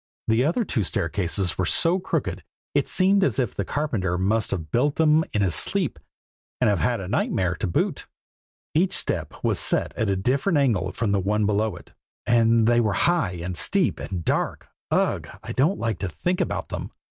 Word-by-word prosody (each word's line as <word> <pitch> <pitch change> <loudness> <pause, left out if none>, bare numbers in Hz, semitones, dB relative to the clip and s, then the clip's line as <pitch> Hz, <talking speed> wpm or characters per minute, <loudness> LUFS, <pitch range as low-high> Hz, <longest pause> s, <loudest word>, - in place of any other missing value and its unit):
The 115 +2 +3
other 195 +10 +1
two 120 - -1
staircases 90 +1 -1
were 95 - +2
so 170 - +3
crooked 185 - -3 0.3
it - - +1
seemed 195 +1 +3
as - - +1
if 125 -6 0
the 100 - -2
carpenter 100 - -2
must 100 +4 0
have 80 -5 -4
built 140 +5 +1
them 155 0 +4
in 105 - +1
his 90 -4 +1
sleep, - - +1 0.6
and - - +3
have 100 - 0
had 120 -1 +1
the 95 -3 -6
nightmare 95 -4 0
to 110 - -2
boot. 85 - -1 0.7
Each 180 +4 +2
step 80 -7 -1
was - - +1
set - - +1
at 110 - -1
a 100 - +1
different 135 - +1
angle 120 - +1
from 115 -4 -2
the 100 - +2
one 105 +3 0
below 105 +1 0
it; - - -14 0.3
and 115 -1 +3
they 120 +1 +4
were 110 -4 +1
high, 170 - +1
and 90 0 -4
steep, 190 - +2
and 90 -4 -5
dark - - -1 0.2
ugh! - - 0
I - - -6
don't 155 +9 +1
like 115 -2 -2
to 95 - -3
think 180 - -2
about - - -3
them. - - -5
110 Hz, 195 wpm, -24 LUFS, 95-145 Hz, 0.7 s, them